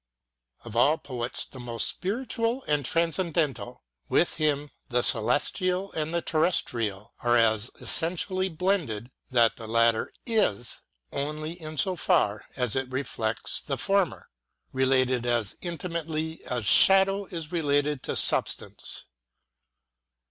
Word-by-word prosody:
Of 115 -2 -9
all 140 +7 +4
poets 125 -5 -4
the 130 - -12
most 120 -2 -1
spiritual 230 +4 -2
and 150 -1 0
transcendental, 165 -5 0 0.3
with 175 - +2
him 150 -2 0 0.2
the 125 -1 +1
celestial 185 - +1
and 155 0 -2
the 170 0 -1
terrestrial 115 - 0
are 120 0 +3 0.2
so 110 +5 -7
essen 165 +1 +2
tially 185 -1 -2
blended 150 - 0 0.2
that 120 -3 +3
the 115 - -8
latter 115 0 +2
is, 165 - +1 0.3
only 150 +2 -3
in 155 0 -7
so 185 +5 +3
far 160 - +1
as 125 -4 +1
it 130 -1 -1
reflects 120 -4 -3
the 135 -2 -3
former, 195 +1 0 0.5
related 130 -2 +2
as 120 -4 0
intimately 165 -2 -4
as 120 -4 -3
shadow 195 - +6
is 165 -4 -7
related 145 -4 +1
to - - -3
substance. - - -1
150 Hz, 125 wpm, -27 LUFS, 120-175 Hz, 0.5 s, shadow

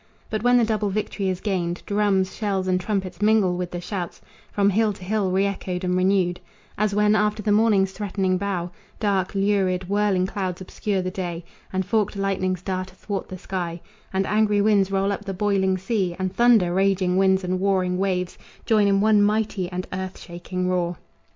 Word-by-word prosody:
But 215 -1 -1
when 245 +1 +4
the 235 - +4
double 215 -2 0
victory 200 -1 -2
is 185 -1 -3
gained, 175 -4 -2
Drums, 200 -2 +1
shells 195 -4 -1
and 185 0 +2
trumpets 190 -2 -3
mingle 210 -4 +3
with 180 0 -3
the 175 - -5
shouts 180 -1 -5 0.3
From 200 0 +2
hill 215 +1 +2
to 190 - -12
hill 200 0 0
re 190 +2 +2
echoed 190 -2 -3
and 180 0 0
renewed 185 -1 +2 0.4
As 210 -1 0
when, 210 0 +4
after 210 0 +1
the 210 - +1
morning's 205 -3 +3
threatening 190 -2 -1
bow, 180 -3 -2 0.3
Dark, 200 -3 0
lurid, 195 -2 +1
whirling 200 -2 +2
clouds 185 -2 -3
obscure 190 +1 -2
the 185 - -3
day, 175 -2 -5 0.3
And 190 0 -1
forked 210 0 0
lightnings 185 -2 -1
dart 185 0 -3
athwart 195 +1 -5
the 185 - -6
sky, 175 -2 -4 0.3
And 195 0 0
angry 210 0 +2
winds 200 -2 +3
roll 195 0 +1
up 200 - -4
the 195 -2 -5
boiling 190 -1 +1
sea, 190 -2 -1
And 185 0 -2
thunder, 230 -8 +4
raging 190 -1 +2
winds 190 0 +3
and 185 0 -1
warring 185 -2 +1
waves 185 -2 -1 0.3
Join 215 -2 +3
in 195 0 +3
one 215 -1 +4
mighty 205 -3 +1
and 180 0 -3
earth 185 0 -4
shaking 180 +1 -5
roar. 175 -2 0
195 Hz, 190 wpm, -23 LUFS, 185-205 Hz, 0.4 s, when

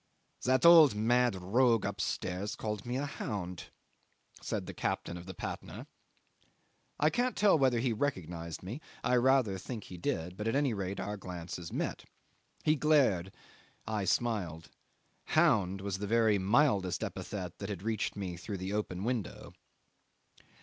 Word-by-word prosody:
"That 130 +2 +3
old 160 -8 +9
mad 120 +1 +3
rogue 115 +5 +2
upstairs 100 0 -2
called 105 0 -4
me 125 +1 -1
a 140 - -1
hound," 90 - -5 0.8
said - - -3
the - - -7
captain 85 - -2
of 90 +1 -9
the 95 - -7
Patna. - - -6 1.1
I 150 +2 +4
can't 245 -1 0
tell 205 -1 +5
whether 130 -5 +3
he 120 0 +1
recognised 85 - -3
me 115 +11 -6 0.2
I 125 - +2
rather 120 -6 +3
think 110 +2 -6
he 90 - -10
did; 90 +1 -2
but 105 - -3
at 115 - +1
any 140 -3 +2
rate 100 -1 -3
our 105 +1 -3
glances 90 -2 -7
met. - - -3 0.6
He 155 - +4
glared 135 - +3 0.5
I 110 -3 -2
smiled; 90 -6 -1 0.5
hound 95 -2 +3
was 95 -1 -3
the 105 - -3
very 110 -2 +3
mildest 100 -2 +2
epithet 90 -5 -5
that 100 - -5
had 95 -3 -5
reached 110 -1 -1
me 95 -4 -4
through 100 +3 -5
the 95 +2 -4
open 100 -3 -2
window. 120 -3 -3
105 Hz, 150 wpm, -32 LUFS, 95-125 Hz, 1.1 s, old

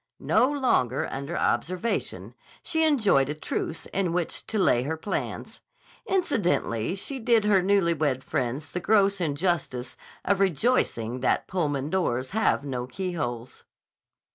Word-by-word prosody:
No 260 - +3
longer 195 - +1
under 140 +5 -4
observation, 185 +7 -1 0.3
she 320 -2 +1
enjoyed 210 - +3
a 150 - -2
truce 160 +1 -3
in 185 -3 0
which 175 -2 -2
to 220 - -2
lay 155 -11 +3
her 155 +5 -3
plans. 200 - -4 0.5
Incidentally 190 - 0
she 265 +7 -4
did 230 -2 +3
her 200 -3 +4
newly 190 -2 +3
wed 140 -4 -1
friends 130 +5 -3
the 180 - -2
gross 200 0 +3
injustice 150 -5 -1 0.3
of 200 -1 +2
rejoicing 155 - +1
that 125 - +1
Pullman 150 -5 -1
doors 130 -9 0
have 220 -9 +1
no 125 -3 -3
keyholes. 130 -9 -4
175 Hz, 135 wpm, -26 LUFS, 135-200 Hz, 0.5 s, her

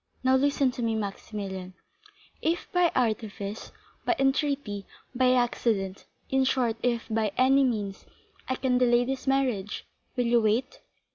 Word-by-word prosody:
Now 260 0 +4
listen 275 -1 +2
to 250 0 -6
me, 225 -1 0
Maximilian; 195 -3 -5 0.7
if 330 +2 0
by 355 -2 +3
artifice, 215 -3 -2 0.3
by 355 - +2
entreaty, 270 -7 0 0.3
by 255 0 +4
accident—in 235 +1 0
short, 250 -3 +1
if 235 -2 0
by 220 -2 0
any 270 +2 +5
means 210 -6 -2 0.4
I 260 - +1
can 255 -1 +1
delay 245 -1 +4
this 265 +1 -4
marriage, 255 -7 0 0.3
will 245 - +2
you 235 0 +4
wait?" 225 +5 0
245 Hz, 135 wpm, -27 LUFS, 215-265 Hz, 0.7 s, any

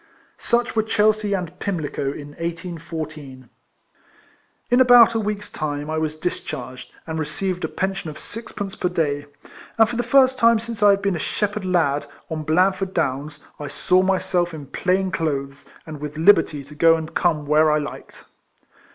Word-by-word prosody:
Such 235 -1 0
were 220 - +4
Chelsea 215 -1 +1
and 180 -2 -5
Pimlico 165 -8 -3
in 145 0 -8
1814. 160 -5 -7 1.2
In 245 +1 +5
about 245 -2 +7
a 225 - 0
week's 210 -1 -4
time 145 0 -4
I 160 - -1
was 155 0 -2
discharged, 130 -6 -5
and 160 -1 -4
received 180 +4 -3
a - - +1
pension 195 -3 -3
of 150 - -9
sixpence 205 -3 -6
per 180 - -1
day; 145 -4 -1 0.5
and, 225 -1 +6
for 240 +1 -4
the - - +2
first 260 +1 +4
time 230 0 +5
since 230 -1 -7
I 205 - +7
had 200 0 +3
been 200 -2 +1
a - - -3
shepherd 205 +3 -2
lad 160 -6 +1 0.2
on 160 -1 -2
Blandford 185 +4 +1
Downs, 145 +3 -2 0.2
I 145 - -5
saw 180 +5 +2
myself 180 -2 0
in 145 -2 -8
plain 185 +6 0
clothes, 140 -5 -3 0.2
and 155 -3 -8
with 150 0 -6
liberty 160 -4 +4
to 140 +2 -14
go 165 +2 +5
and 160 -1 -6
come 155 -4 +1
where 155 +1 +4
I 150 - +3
liked. 150 -1 -7
170 Hz, 170 wpm, -22 LUFS, 150-200 Hz, 1.2 s, about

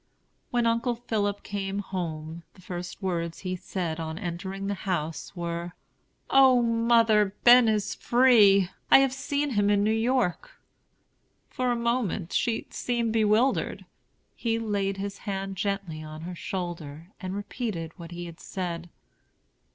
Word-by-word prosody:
When 240 -1 +1
Uncle 235 +1 +1
Philip 205 -4 -2
came 200 -1 -3
home, 170 -4 -4
the 185 - -17
first 180 +2 -7
words 170 -3 -2
he 185 -1 -3
said, 170 -3 -4
on 160 0 -4
entering 190 +1 -5
the 200 - -1
house, 175 -4 -3
were: 170 0 -4 0.6
"O 260 -2 +6
mother, 230 -3 +3
Ben 245 0 +8
is 210 -2 0
free! 215 -7 +5 0.2
I - - +9
have 270 -1 +3
seen 285 +1 -1
him 205 -3 +2
in 205 -1 +3
New 215 - +2
York." 245 - 0 0.9
For 255 -1 -1
a - - +1
moment 235 -7 -1
she 230 -2 0
seemed 235 -2 -1
bewildered. 220 +4 +2 0.5
He 225 -1 -1
laid 200 -3 -1
his 200 0 -5
hand 195 0 -3
gently 195 -5 -3
on 155 0 -8
her 175 +2 -6
shoulder 170 -2 -6
and 185 -1 -5
repeated 205 -5 -4
what 170 -1 -8
he 175 0 -6
had 170 -1 -10
said. 175 -2 -5
200 Hz, 145 wpm, -27 LUFS, 175-230 Hz, 0.9 s, I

